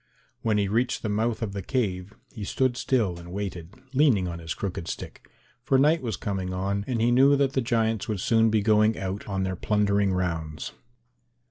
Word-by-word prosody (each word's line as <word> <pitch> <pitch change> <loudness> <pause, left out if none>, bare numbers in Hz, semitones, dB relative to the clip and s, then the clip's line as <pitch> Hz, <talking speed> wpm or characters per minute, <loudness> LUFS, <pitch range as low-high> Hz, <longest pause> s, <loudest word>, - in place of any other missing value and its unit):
When 110 -2 +1
he 100 -1 +1
reached 115 +5 0
the 110 - -1
mouth 110 +2 0
of 100 -3 -3
the 100 - -4
cave, 100 -4 -2 0.2
he 110 - -6
stood 130 +4 0
still 110 -10 0
and 85 0 -10
waited, 95 -1 -5 0.2
leaning 130 -10 +3
on 85 -1 -5
his 80 -1 -5
crooked 90 -4 -4
stick, - - -7 0.3
for 135 0 +3
night 150 +5 +4
was 115 -6 -3
coming 95 -2 -3
on 100 +2 -1
and 125 -3 -1
he 115 +2 +3
knew 135 +3 +6
that 140 -1 +1
the 130 - +1
giants 115 -3 0
would 105 -3 -2
soon 115 +3 +3
be 110 -1 +2
going 110 +1 +4
out 95 +1 -4
on 95 -2 -1
their 95 0 -2
plundering 100 0 +1
rounds. 80 -4 -3
105 Hz, 200 wpm, -26 LUFS, 95-120 Hz, 0.3 s, knew